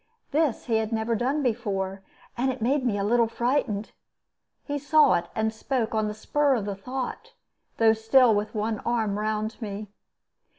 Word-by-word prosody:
This 300 -4 +1
he 230 -3 +1
had 220 0 -1
never 225 +1 0
done 265 +6 0
before, 195 -5 -2 0.3
and 260 +2 +1
it 260 - -7
made 260 +5 +1
me 230 -5 0
a 200 - -1
little 230 +2 +3
frightened. 235 -3 -1 0.7
He 290 -1 -3
saw 295 0 +5
it, 170 0 0
and 220 0 0
spoke 230 0 -2
on 215 -1 +1
the 210 - -4
spur 285 +5 +1
of 215 -5 -2
the 205 - -2
thought, 250 +6 -5 0.4
though 225 -1 +5
still 225 +2 +4
with 210 +2 -2
one 215 0 -1
arm 220 -4 -1
round 215 +2 -2
me. 210 -1 -5
225 Hz, 175 wpm, -26 LUFS, 215-255 Hz, 0.7 s, saw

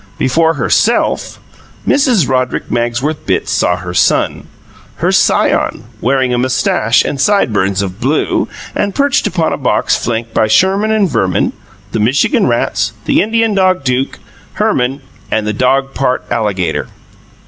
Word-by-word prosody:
Before 160 +5 +2
HERSELF, - - +1 0.5
Mrs. 250 - +3
Roderick 130 -1 -1
Magsworth 120 +6 -1
Bitts - - 0
saw 90 - +1
her 90 0 -7
son - - +1 0.5
her - - 0
scion - - +1 0.2
wearing 130 0 +1
a 120 - +1
moustache 125 -3 +1
and 140 - -2
sideburns 105 - +1
of 95 +1 -6
blue, 140 +5 0 0.3
and 200 -1 -2
perched 280 -1 +1
upon 165 -2 0
a - - -2
box 135 - +1
flanked 115 -1 -3
by 110 - +2
Sherman 190 - +2
and 215 -3 +2
Verman, 95 - 0 0.4
the 110 - -2
Michigan 140 - +2
rats, 105 -3 0
the - - +3
Indian 225 0 +1
dog 185 -4 +2
Duke, 125 0 -1 0.4
Herman, 130 +3 0 0.3
and 110 -1 -1
the 105 - -1
dog 135 +4 +1
part 130 -1 -1
alligator. 105 -6 -1
130 Hz, 140 wpm, -14 LUFS, 110-165 Hz, 0.5 s, Mrs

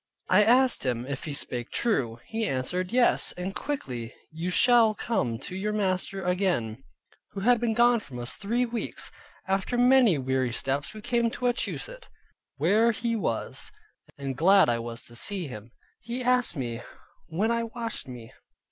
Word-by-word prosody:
I 195 +3 +6
asked 250 +4 +4
him, 125 -2 -1
if 135 0 -5
he 150 - -4
spake 120 -3 -3
true? 130 - 0
He 225 0 -2
answered, 180 +8 -2
"Yes, 245 0 +3
and 180 +2 -5
quickly 125 - -5 0.2
you 165 +3 -4
shall 230 +2 +5
come 125 - -1
to 180 - -7
your 210 +3 -2
master 195 -1 -1
again; 175 - 0 0.5
who 195 - -5
had 240 +3 +4
been 230 -2 0
gone 240 0 +5
from 135 -11 -10
us 120 0 -2
three 235 +5 0
weeks." 235 -1 -2 0.4
After 195 +5 0
many 245 - +5
weary 130 -2 -1
steps 140 - -2
we 215 - -8
came 235 0 +1
to 250 - -5
Wachusett, 475 - -2 0.5
where 225 +3 +3
he 230 +1 -2
was: 115 - -2 0.5
and 135 -2 -4
glad 190 +3 +5
I 120 -1 +1
was 115 0 -7
to 120 - -10
see 190 +8 -2
him. 110 -3 -9 0.3
He 245 +2 -4
asked 250 -5 +3
me, 120 -4 -4 0.5
when 200 +8 0
I 230 0 0
washed 230 - -4
me? 120 -3 -10
195 Hz, 165 wpm, -27 LUFS, -, 0.5 s, I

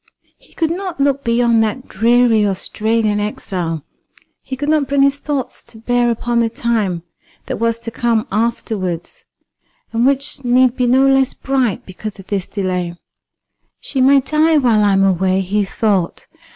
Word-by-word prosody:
He - - -22
could 325 -1 0
not 360 -2 -5
look 280 0 +1
beyond 235 -1 +3
that 220 +4 -3
dreary 230 0 +3
Australian 210 +2 0
exile; 175 -6 -4 0.6
he 265 - -6
could 290 +3 -4
not 305 -3 +2
bring 280 0 +2
his 280 0 +2
thoughts 285 -3 -4
to 235 -1 -13
bear 240 +1 +1
upon 235 +1 0
the 230 -1 +2
time 215 -7 -1 0.4
that - - -4
was 230 0 0
to 230 0 -7
come 230 +1 0
afterwards, 200 -5 -3 0.7
and 230 +1 +1
which 275 +1 0
need 250 0 +3
be 250 -2 0
no 260 +2 +4
less 270 -1 +2
bright 260 -6 -1
because 200 +3 -8
of 195 - -12
this 195 -2 -3
delay. 180 -3 -3 0.8
"She 265 - -2
may 275 +1 +5
die 310 +3 +2
while 235 -6 +3
I 200 -1 +3
am 195 0 +3
away," 190 0 +2
he 200 +2 0
thought. 195 -3 -1
230 Hz, 165 wpm, -17 LUFS, 205-265 Hz, 0.8 s, may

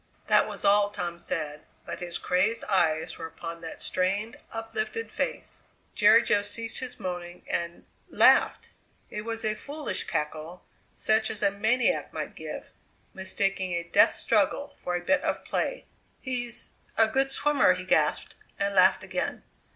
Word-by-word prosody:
That - - +4
was - - -5
all 205 0 +5
Tom 175 -4 -5
said, 155 -3 -3 0.2
but - - -6
his 175 -1 -4
crazed 195 +6 +1
eyes 160 -5 +1
were 165 - -4
upon 165 +1 -8
that 165 - -6
strained, 200 +5 -1 0.2
uplifted 430 - -4
face. - - -4 0.3
Jerry 220 0 +6
Jo 205 - +3
ceased 225 +2 -2
his 255 -2 -5
moaning 175 -1 -6
and 170 0 -3 0.2
laughed! - - +4 0.4
It 210 - -4
was 225 -1 -3
a 215 - +2
foolish 285 -1 -4
cackle, 155 +3 -4 0.3
such 220 0 +2
as 210 - -3
a 200 - +4
maniac 220 +5 +1
might - - -4
give, - - -8 0.4
mistaking 190 -1 -1
a 170 0 -1
death 170 - +4
struggle 285 0 +1
for 180 - -3
a 175 0 -4
bit 290 +6 +3
of - - -2
play. - - -2 0.3
"He's 245 -2 -3 0.3
a 225 - +6
good 270 +4 +1
swimmer!" 285 -7 +4
he 185 0 -7
gasped, 155 -4 +1 0.2
and 200 0 0
laughed - - +5
again. - - -3
200 Hz, 155 wpm, -27 LUFS, 175-230 Hz, 0.4 s, Jerry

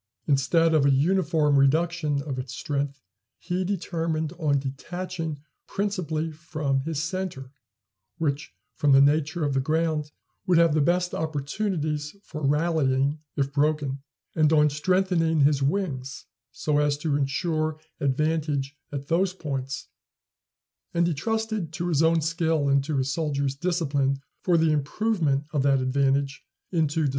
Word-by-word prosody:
Instead 160 +4 +3
of 155 -3 +4
a 140 - +4
uniform 155 0 +3
reduction 155 0 +2
of 135 -3 -4
its 130 0 -6
strength, 140 -2 -3 0.3
he 180 +1 -2
determined 165 -4 -2
on 145 -4 +2
detaching 160 +3 -4 0.3
principally 165 -6 -2
from 155 -3 -2
his 155 +2 -2
centre, 165 -7 -4 0.7
which, 145 -2 -2 0.2
from 145 -3 +3
the 135 - +7
nature 155 +3 +3
of 145 - 0
the 135 - +2
ground, 155 +1 0 0.4
would 180 -2 +4
have 165 -2 +5
the 155 - +3
best 175 +3 +1
opportunities 150 0 -2
for 155 - -7
rallying, 145 -1 +1 0.2
if 140 0 -1
broken; 145 -2 0 0.3
and 155 -1 +3
on 150 -1 +4
strengthening 165 0 +1
his 140 0 +4
wings 140 -4 -2 0.3
so 150 -1 0
as 145 -1 +2
to 150 -1 -1
insure 155 +2 -1 0.2
advantage 145 0 0 0.2
at 140 -1 -5
those 185 +3 +1
points; 135 -5 -4 1.1
and 170 0 +3
he 170 - +1
trusted 220 +1 -2
to 175 +2 -3
his 155 -3 +2
own 165 0 +4
skill 160 -2 0
and 140 0 +3
to 150 0 -2
his 130 0 0
soldiers' 140 -3 -1
discipline 140 -4 0 0.2
for 175 -2 +3
the 160 -1 +3
improvement 150 -1 0
of 145 - +2
that 135 0 +3
advantage 135 +2 +1 0.3
into 160 -3 +1
decisive - - +2
victory. 145 - +2
150 Hz, 145 wpm, -26 LUFS, 140-165 Hz, 1.1 s, the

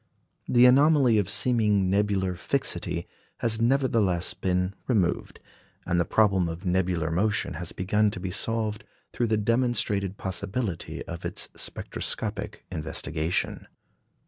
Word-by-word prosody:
The 120 0 +5
anomaly 135 -3 +5
of 100 -2 -1
seeming 105 -5 +2
nebular 95 -1 +1
fixity 85 - -2 0.3
has 115 -1 -1
nevertheless 115 -8 +2
been 90 0 -1
removed; 95 -9 0 0.5
and 85 - +1
the 85 - +2
problem 95 -5 +2
of 85 +4 -7
nebular 90 -3 0
motion 105 +4 0
has 90 - -5
begun 105 +3 +1
to 100 - -6
be 90 0 -4
solved 110 +2 -1 0.3
through 120 - 0
the 110 -1 +1
demonstrated 105 -4 +1
possibility 95 +1 -3
of 85 0 -7
its - - -3
spectroscopic - - -3
investigation. 80 +1 -2
100 Hz, 120 wpm, -26 LUFS, 90-115 Hz, 0.5 s, The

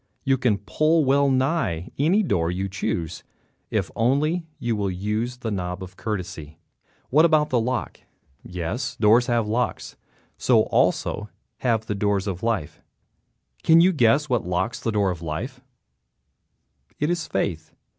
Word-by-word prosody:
You 135 -1 +3
can 120 -6 +1 0.2
open 155 0 +4
well 140 +1 +3
nigh 130 - 0
any 180 +9 +3
door 85 - 0
you 95 +2 -2
choose 85 -3 -3 0.5
if - - -1
only 150 +8 +1
you 120 -1 -1
will 100 -2 -1
use 105 +6 -2
the 115 -3 -4
knob 90 -1 -3
courtesy. 90 -8 -5 0.5
What 150 +5 +6
about 155 -2 +3
the 125 - +3
lock? 125 +3 -2 0.4
Yes, 90 +7 -4
doors 115 +3 +4
have 120 -3 +1
locks. 120 +3 -2 0.4
So - - +4
also - - 0 0.3
have 115 -3 0
the 105 - -2
doors 100 -1 0
of 95 -3 -4
life. 110 -10 -2 0.8
Can 165 +1 +6
you 180 +3 +6
guess 140 +2 +3
what 125 -5 0
locks 90 +6 -1
the 115 - -2
door 100 -3 +1
of 85 -2 -6
life? 120 - -5 1.4
It 150 +3 +1
is 175 -2 -2
faith. 80 -5 -2
115 Hz, 145 wpm, -24 LUFS, 95-135 Hz, 1.4 s, What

